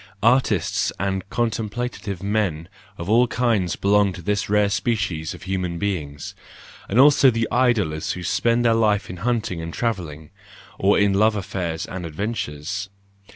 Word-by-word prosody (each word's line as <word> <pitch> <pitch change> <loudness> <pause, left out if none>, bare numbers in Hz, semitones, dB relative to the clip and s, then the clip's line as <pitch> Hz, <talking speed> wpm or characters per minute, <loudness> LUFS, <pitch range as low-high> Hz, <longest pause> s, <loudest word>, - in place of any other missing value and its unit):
Artists 125 +4 +2
and 95 0 -2
contemplative 115 -3 -3
men 100 -6 -1 0.3
of 85 - -6
all 120 +4 +4
kinds 115 -7 0
belong 100 -1 +2
to 90 - -10
this 105 +2 -1
rare 105 0 +3
species 105 -10 -1
of - - -13
human 90 -3 -2
beings; 80 -7 -4 0.6
and 110 - +2
also 140 -1 +7
the 115 -2 0
idlers 105 -11 +1
who 90 - -7
spend 115 +8 +1
their 115 - +5
life 105 -4 +1
in 90 - -8
hunting 110 -4 -1
and 80 0 -5
travelling, 85 -10 -4 0.5
or 100 +1 +3
in 100 -1 +3
love 105 +2 +3
affairs 95 -5 -3
and 95 -1 -6
adventures. 95 0 -4
100 Hz, 150 wpm, -22 LUFS, 90-115 Hz, 0.6 s, also